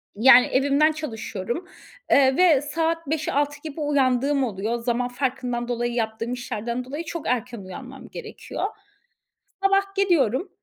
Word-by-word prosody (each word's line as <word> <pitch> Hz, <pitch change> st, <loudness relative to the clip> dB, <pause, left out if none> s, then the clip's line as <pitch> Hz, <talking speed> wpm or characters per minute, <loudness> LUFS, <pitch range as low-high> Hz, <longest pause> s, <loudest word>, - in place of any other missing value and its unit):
Yani 245 Hz, +3 st, +7 dB
evimden 285 Hz, +4 st, +3 dB
çalışıyorum, 245 Hz, -, -5 dB, 0.4 s
eee, 265 Hz, -1 st, +5 dB
ve 335 Hz, -7 st, +5 dB
saat 325 Hz, +2 st, -1 dB
05.00-06.00 290 Hz, -1 st, -1 dB
gibi 310 Hz, 0 st, -6 dB
uyandığım 275 Hz, -1 st, +2 dB
oluyor. 215 Hz, -1 st, -2 dB
Zaman 240 Hz, +1 st, 0 dB
farkından 245 Hz, -1 st, -2 dB
dolayı, 240 Hz, 0 st, -1 dB
yaptığım 230 Hz, +1 st, -2 dB
işlerden 245 Hz, 0 st, -4 dB
dolayı 295 Hz, +6 st, -5 dB
çok 335 Hz, -1 st, -5 dB
erken 240 Hz, -2 st, -1 dB
uyanmam 255 Hz, +8 st, -10 dB
gerekiyor. 445 Hz, -2 st, -7 dB, 1.0 s
Sabah 390 Hz, 0 st, +2 dB
gidiyorum, 345 Hz, -, +2 dB
265 Hz, 125 wpm, -24 LUFS, 240-310 Hz, 1.0 s, Yani